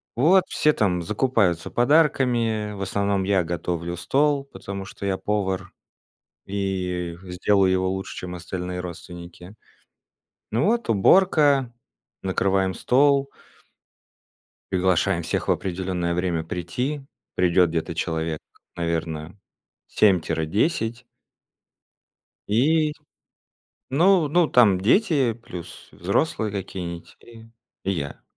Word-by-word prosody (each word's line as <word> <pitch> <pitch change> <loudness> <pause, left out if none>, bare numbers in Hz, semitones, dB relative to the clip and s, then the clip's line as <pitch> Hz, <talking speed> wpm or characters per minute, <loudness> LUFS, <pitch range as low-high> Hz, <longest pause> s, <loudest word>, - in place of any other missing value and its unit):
Вот, 175 +9 +5
все 150 0 +2
там 90 -4 +1
закупаются 100 -4 +1
подарками, 120 -6 +2
в 100 - -8
основном 100 0 0
я 95 -2 +2
готовлю 85 0 -3
стол, 140 - +1
потому 100 -7 -7
что 100 - -8
я 95 -1 0
повар 95 -3 -2 0.7
и 90 -3 -3
сделаю 95 +1 +2
его 95 0 +1
лучше 95 0 -5
чем 90 0 -6
остальные 90 +1 -5
родственники. 90 +2 -10 1.0
Ну, 115 +5 +1
вот 235 +3 +1
уборка, 140 - +4 0.5
накрываем 95 0 +1
стол. 140 +1 +3 1.4
Приглашаем 95 -1 +2
всех 80 - -2
в - - +3
определенное 90 -2 -2
время 85 -2 -1
прийти. 125 - -3 0.3
Придёт 90 -1 +3
где-то 80 0 -3
человек 80 -1 -2 0.4
наверно 85 +1 -3 0.5
7 95 -4 +4
тире 80 0 -2
10. 115 - -1 1.4
И, 150 +7 +2 1.0
ну 170 +2 +4
ну 175 +1 +3
там 105 -9 +5
дети, 135 - +3
плюс 90 -7 -10
взрослые 105 - -1
какие-нить 90 -3 -6
и 115 -1 -15 0.4
и 95 - 0
я. 70 -6 -4
95 Hz, 105 wpm, -24 LUFS, 90-125 Hz, 1.4 s, Вот